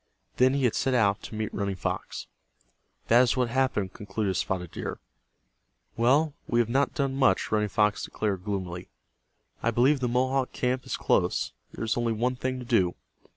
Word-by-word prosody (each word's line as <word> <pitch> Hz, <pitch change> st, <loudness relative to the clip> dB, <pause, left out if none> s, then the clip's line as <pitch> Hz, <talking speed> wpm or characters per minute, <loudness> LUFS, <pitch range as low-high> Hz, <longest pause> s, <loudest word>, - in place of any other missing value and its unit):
Then 130 Hz, +2 st, +4 dB
he 140 Hz, -, 0 dB
had 120 Hz, -, +3 dB
set 130 Hz, -1 st, +1 dB
out 100 Hz, -4 st, +3 dB
to -, -, -8 dB
meet 110 Hz, 0 st, -3 dB
Running 100 Hz, -1 st, -2 dB
Fox. 90 Hz, -, -4 dB, 0.8 s
"That 120 Hz, +2 st, +6 dB
is 125 Hz, +1 st, +2 dB
what 125 Hz, -2 st, +1 dB
happened," 120 Hz, -7 st, 0 dB
concluded 105 Hz, -1 st, -2 dB
Spotted 90 Hz, -3 st, -2 dB
Deer. -, -, -5 dB, 1.0 s
"Well, 140 Hz, +6 st, +3 dB
we 120 Hz, -, +1 dB
have 115 Hz, -1 st, +2 dB
not 135 Hz, +6 st, +1 dB
done 140 Hz, -4 st, 0 dB
much," 130 Hz, -9 st, +2 dB
Running 105 Hz, -1 st, +1 dB
Fox 105 Hz, +1 st, +1 dB
declared, 100 Hz, -4 st, -2 dB
gloomily. 95 Hz, -3 st, -4 dB, 0.7 s
"I 115 Hz, -, +1 dB
believe 130 Hz, +5 st, +3 dB
the 125 Hz, -, 0 dB
Mohawk 130 Hz, +2 st, 0 dB
camp 125 Hz, 0 st, -1 dB
is -, -, -2 dB
close. -, -, +1 dB, 0.2 s
There -, -, -4 dB
is 110 Hz, -, 0 dB
only 120 Hz, -1 st, +1 dB
one 125 Hz, +3 st, 0 dB
thing 130 Hz, +1 st, -2 dB
to 125 Hz, -, -7 dB
do. 95 Hz, -8 st, +2 dB
120 Hz, 180 wpm, -27 LUFS, 105-130 Hz, 1.0 s, That